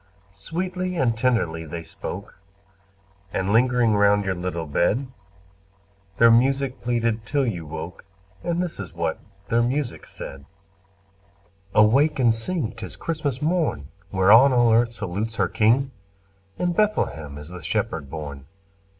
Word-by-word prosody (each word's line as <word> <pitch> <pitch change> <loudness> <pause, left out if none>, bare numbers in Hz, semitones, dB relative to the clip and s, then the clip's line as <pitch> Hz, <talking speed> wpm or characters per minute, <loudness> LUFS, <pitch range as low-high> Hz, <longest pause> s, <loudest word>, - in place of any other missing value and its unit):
Sweetly 185 +2 -3
and 120 -6 +2
tenderly 115 -10 0
they 85 +1 -6
spoke, 95 +5 -8 0.9
And 95 +1 -1
lingering 120 -1 +3
round 100 0 +4
your 95 - 0
little 90 -2 -4
bed, 90 - +1 1.1
Their 115 0 +7
music 135 +2 +2
pleaded 115 -2 0
till 140 +4 0
you 90 -9 -3
woke, 80 +3 -7 0.4
And 170 +1 0
this 175 - -6
is 95 -4 -7
what 85 -1 -2 0.3
their 115 +1 +3
music 125 +2 -2
said: 70 0 -9 1.3
"Awake 135 +9 +4
and 120 -4 +4
sing! 120 +2 -3
'tis - - -8
Christmas 150 -5 -3
morn, 155 - 0 0.2
Whereon 105 +8 +6
all 120 -2 +4
earth 115 +1 +3
salutes 105 +3 -4
her - - +1
King! 125 +5 +2 0.7
In 175 -1 0
Bethlehem 80 - 0
is 75 +2 -10
the 90 0 -9
Shepherd 70 -2 -2
born. 70 -3 -7
115 Hz, 135 wpm, -24 LUFS, 90-135 Hz, 1.3 s, Their